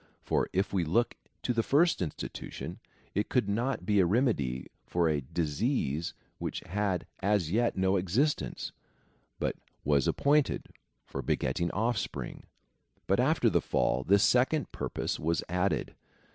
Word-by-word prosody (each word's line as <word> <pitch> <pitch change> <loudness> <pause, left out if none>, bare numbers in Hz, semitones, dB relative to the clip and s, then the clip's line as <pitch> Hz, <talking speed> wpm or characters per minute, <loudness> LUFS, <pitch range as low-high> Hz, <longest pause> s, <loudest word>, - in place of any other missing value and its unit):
For - - +1
if 95 +2 0
we 95 -3 +2
look 105 +10 +2 0.3
to 125 - +1
the 115 - +2
first 155 - +3
institution, 80 -5 -5 0.3
it 105 +2 0
could 125 -6 +2
not 115 0 -1
be 105 +1 +3
a 95 - +6
remedy 85 - +1 0.2
for 85 -1 +2
a 75 -2 +1
disease 80 - -1 0.2
which - - -3
had 95 -3 -1
as 100 -5 +1
yet 120 +2 +2
no 95 +1 +3
existence, 110 - 0 0.7
but - - -1 0.3
was 70 -2 +3
appointed 145 0 +2 0.4
for - - -5
beget 65 - 0
ting 85 0 +1
offspring; 110 +2 -2 0.6
but - - +2
after - - +3
the - - +3
fall, 65 - +1
this 100 +6 +4
second 130 +3 +3
purpose - - -3
was 85 +1 0
added. 90 +3 0
100 Hz, 145 wpm, -30 LUFS, 85-120 Hz, 0.7 s, a